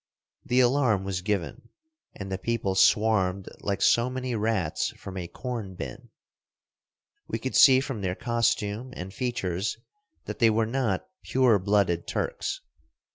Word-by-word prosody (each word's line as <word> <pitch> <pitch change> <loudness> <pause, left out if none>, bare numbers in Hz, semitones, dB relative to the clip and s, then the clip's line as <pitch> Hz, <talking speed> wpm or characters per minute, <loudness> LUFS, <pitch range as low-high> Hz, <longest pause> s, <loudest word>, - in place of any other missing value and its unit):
The 125 +1 +3
alarm 125 -6 +2
was 95 -2 -3
given, 100 -3 -3 0.5
and 95 -1 -7
the 95 - -2
people 115 -3 -1
swarmed 100 -2 +3
like 100 -1 -2
so 120 +2 +4
many 130 -1 -3
rats 105 -7 0
from 95 - -9
a 90 -2 -4
corn 115 -4 -6
bin. 120 +7 -8 1.2
We - - -2
could 130 - -4
see 130 -2 +8
from 135 -6 -5
their 90 -1 -1
costume 115 0 -1
and 95 +2 -7
features 100 -5 -2 0.5
that - - -6
they 115 - +5
were 110 +1 +2
not 115 -5 -1
pure 125 -5 +3
blooded 95 -3 +1
Turks. - - -3
110 Hz, 140 wpm, -27 LUFS, 95-120 Hz, 1.2 s, see